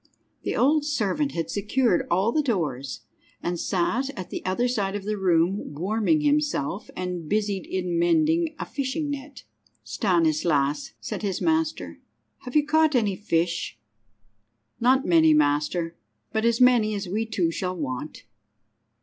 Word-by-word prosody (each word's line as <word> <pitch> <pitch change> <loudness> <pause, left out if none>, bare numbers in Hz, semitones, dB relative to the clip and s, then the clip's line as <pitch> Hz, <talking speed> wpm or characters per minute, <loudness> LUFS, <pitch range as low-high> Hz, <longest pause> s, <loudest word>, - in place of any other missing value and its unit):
The - - -2
old 295 +4 +3
servant 285 0 -1
had 165 -1 -3
secured 210 0 +1
all 190 +6 +2
the 305 - +2
doors, 150 - -2 0.4
and 175 -1 -2
sat 225 +11 0
at 185 - -7
the - - -5
other 190 +7 0
side 205 -5 -1
of 205 - -4
the 210 +1 -2
room 180 -3 +1
warming 215 - +1
himself, 290 - 0
and 180 -3 -4
busied 205 -2 -1
in 180 -2 -1
mending 315 - +2
a - - -4
fishing 285 +2 -3
net. 280 0 -7 0.4
"Stanislas," 155 - +1
said - - -5
his 195 -4 -2
master, 320 -1 -1 0.4
"have 250 +1 -9
you 300 -1 +4
caught 310 0 +3
any 210 -5 +2
fish?" 170 - -1 1.0
"Not 260 +3 +3
many, 160 -3 +5
master, 150 +3 +1 0.4
but 220 +1 0
as 235 0 +2
many 240 -4 +4
as 200 -1 -4
we 215 +5 -2
two 185 -7 0
shall 185 +2 -3
want." 140 -1 -5
200 Hz, 145 wpm, -25 LUFS, 170-260 Hz, 1.0 s, many